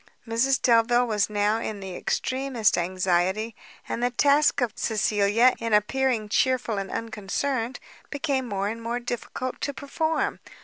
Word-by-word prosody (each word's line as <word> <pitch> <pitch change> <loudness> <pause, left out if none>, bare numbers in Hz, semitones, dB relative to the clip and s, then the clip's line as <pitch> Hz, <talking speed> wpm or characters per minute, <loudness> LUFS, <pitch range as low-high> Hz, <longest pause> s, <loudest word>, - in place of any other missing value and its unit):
Mrs 240 +4 +2
Delvile 240 +1 +4
was 210 -4 0
now 210 +1 +1
in 215 -2 -4
the 190 -2 -7
extremest 255 -2 0
anxiety; 185 +4 0 0.3
and 235 - -3
the 245 - +2
task 285 +4 +3
of 245 -4 0
Cecilia 215 +2 +2
in 230 -1 -2
appearing 230 +1 +1
chearful 245 -1 +1
and 195 -1 -5
unconcerned, 230 +3 -3 0.3
became 280 -4 -1
more 200 -1 -1
and 230 +2 -4
more 235 +1 -2
difficult 245 +1 -5
to 285 - -2
perform. 315 +3 -1
230 Hz, 140 wpm, -25 LUFS, 210-255 Hz, 0.3 s, Delvile